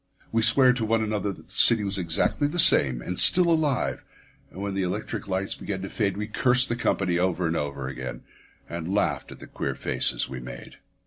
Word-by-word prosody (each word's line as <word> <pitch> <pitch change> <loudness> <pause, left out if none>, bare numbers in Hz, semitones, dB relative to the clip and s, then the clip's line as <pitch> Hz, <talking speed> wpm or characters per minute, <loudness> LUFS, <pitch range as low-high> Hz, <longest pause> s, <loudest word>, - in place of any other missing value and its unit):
We 115 - 0
sware 125 +3 +5
to 125 -2 -4
one 110 0 0
another 105 -1 -3
that - - -14
the - - -9
city 115 -3 +4
was 100 -1 -3
exactly 85 - -1
the 150 - -6
same, 65 - +3
and 90 - -4
still 180 -1 +8
alive; 155 -5 -1 0.5
and 95 - -13
when 100 0 -4
the 95 - -2
electric 95 +3 -5
lights 95 0 -3
began 95 -2 -6
to 95 - -7
fade 100 -3 -2
we 105 - -3
cursed 125 +3 +3
the 120 - -1
company 90 -6 -1
over 90 -1 -1
and 80 0 -1
over 70 -3 -4
again, 65 -1 -8 0.4
and 85 +1 -6
laughed 105 - -2
at - - -11
the - - -12
queer - - -5
faces - - -1
we 65 -1 -8
made. - - -11
100 Hz, 210 wpm, -24 LUFS, 85-115 Hz, 0.5 s, still